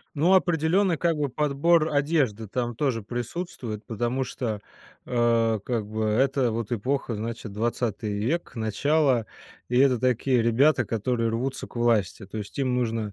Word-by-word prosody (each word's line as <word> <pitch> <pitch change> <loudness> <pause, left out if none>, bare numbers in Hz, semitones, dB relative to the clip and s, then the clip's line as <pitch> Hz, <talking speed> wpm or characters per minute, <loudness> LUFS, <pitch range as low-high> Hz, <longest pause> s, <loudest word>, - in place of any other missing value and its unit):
Ну, 165 +6 +3
определенно, 175 +1 +3
как 165 0 +1
бы 145 -2 0
подбор 150 +4 +2
одежды 140 -8 +1
там 120 +3 -2
тоже 115 -2 -1
присутствует, 120 - -5
потому 120 +4 -1
что, 115 -4 -4 0.5
а, 115 -2 +2
как 110 0 -2
бы 110 +1 -3
это 130 +3 +2
вот 115 0 -3
эпоха, 125 +2 -1
значит, 110 0 -5
20 110 -1 -2
век, 155 +11 -1
начало, 125 +2 +1 0.4
и 125 +1 +1
это 130 -2 +4
такие 125 0 +2
ребята, 120 +3 +3
которые 115 +2 -1
рвутся 125 +4 -2
к - - -15
власти. 110 -4 +1
То 105 +3 -7
есть 105 +4 -8
им 130 -2 +1
нужно 115 -4 -1
120 Hz, 150 wpm, -26 LUFS, 110-140 Hz, 0.5 s, это